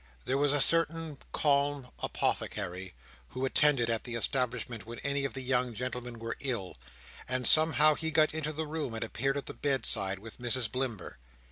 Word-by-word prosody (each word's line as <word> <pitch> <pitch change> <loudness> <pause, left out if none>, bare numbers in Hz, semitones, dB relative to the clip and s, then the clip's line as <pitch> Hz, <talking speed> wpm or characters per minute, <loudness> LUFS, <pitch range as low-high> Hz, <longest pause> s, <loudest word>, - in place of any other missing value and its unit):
There 135 - 0
was 145 -1 +3
a 145 - +2
certain 165 -1 +2
calm 140 -2 +1
Apothecary, 95 -2 -3 0.3
who 130 +1 -3
attended 135 -3 +4
at 115 -1 -1
the 120 -2 -5
establishment 120 -2 0
when 115 +2 -9
any 140 0 -1
of 135 - -4
the 130 - -5
young 125 -2 0
gentlemen 125 0 -4
were 115 0 -5
ill, 115 - -4 0.5
and 130 -1 -1
somehow 155 +1 +6
he 160 +2 -3
got 155 -1 +3
into 155 -1 -2
the 155 +1 -3
room 150 -6 -4
and 110 - -3
appeared 135 +5 -1
at 140 - -4
the - - -7
bedside, 110 -8 0
with 110 +4 -11
Mrs 120 -2 0
Blimber. 120 - -4
130 Hz, 175 wpm, -30 LUFS, 115-145 Hz, 0.5 s, somehow